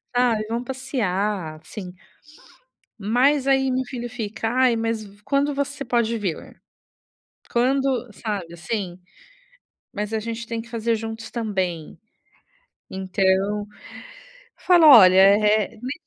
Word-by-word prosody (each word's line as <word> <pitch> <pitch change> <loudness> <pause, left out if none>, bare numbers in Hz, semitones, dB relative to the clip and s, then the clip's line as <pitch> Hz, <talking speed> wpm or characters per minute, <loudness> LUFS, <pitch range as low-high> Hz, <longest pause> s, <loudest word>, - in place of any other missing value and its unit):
Ai 240 -3 +2
vão 235 +2 -3
passear, 210 - -3
assim". 185 +2 -9 1.1
Mas 255 +6 +2
aí 270 0 +3
meu 260 +1 0
filho 240 -1 -6
fica: 220 -2 -4
"Ai, 250 0 +3
mas 225 -1 -2
v 205 0 -17
quando 280 +1 +1
você 280 0 -3
pode 235 -2 0
vir? 195 -7 -5 1.0
Quando" 260 0 +1
sabe, 195 -7 -4
assim? 185 0 -4 0.9
Mas 210 +1 -4
a 220 - 0
gente 230 +1 -5
tem 230 0 -4
que 230 - -15
fazer 230 0 -1
juntos 225 +1 -7
também. 190 -8 -3 0.9
Então, 190 +2 0 0.9
falo: 350 -3 +4
"Olha, 195 -10 +9
eh, 210 +3 +4
me" 255 +2 -4
225 Hz, 120 wpm, -23 LUFS, 200-250 Hz, 1.1 s, Olha